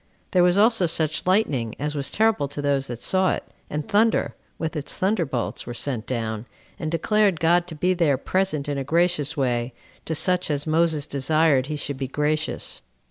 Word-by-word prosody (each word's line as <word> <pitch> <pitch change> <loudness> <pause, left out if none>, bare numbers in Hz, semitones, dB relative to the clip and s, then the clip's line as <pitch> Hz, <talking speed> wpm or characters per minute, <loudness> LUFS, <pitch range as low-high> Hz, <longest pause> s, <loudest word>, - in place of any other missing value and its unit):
There 180 - +4
was 180 +1 +4
also 215 -3 +4
such 160 0 0
lightning, 145 - +1
as 150 +1 -2
was 140 -2 -1
terrible 215 -8 +2
to 145 +1 -8
those 140 -1 0
that 120 -1 -7
saw 185 -1 +2
it; - - -7 0.3
and 150 0 -4
thunder, 220 +2 +2 0.2
with 160 0 -3
its 150 -2 -2
thunderbolts, 170 - -1
were 120 - -5
sent 120 -4 -2
down, 115 -2 -3 0.3
and 155 - -3
declared 200 +1 +2
God 175 +2 +3
to 165 - -7
be 180 +5 +1
there 165 -6 +2
present 155 -1 -1
in 145 -1 -2
a - - -2
gracious 160 0 +1
way 120 -2 0 0.3
to 160 - -2
such 180 +3 +2
as 145 -1 -1
Moses 160 -2 +1
desired 140 -1 +2
he 155 - -3
should 145 -1 -4
be 135 0 -3
gracious. 150 +3 -1
155 Hz, 190 wpm, -24 LUFS, 140-180 Hz, 0.3 s, There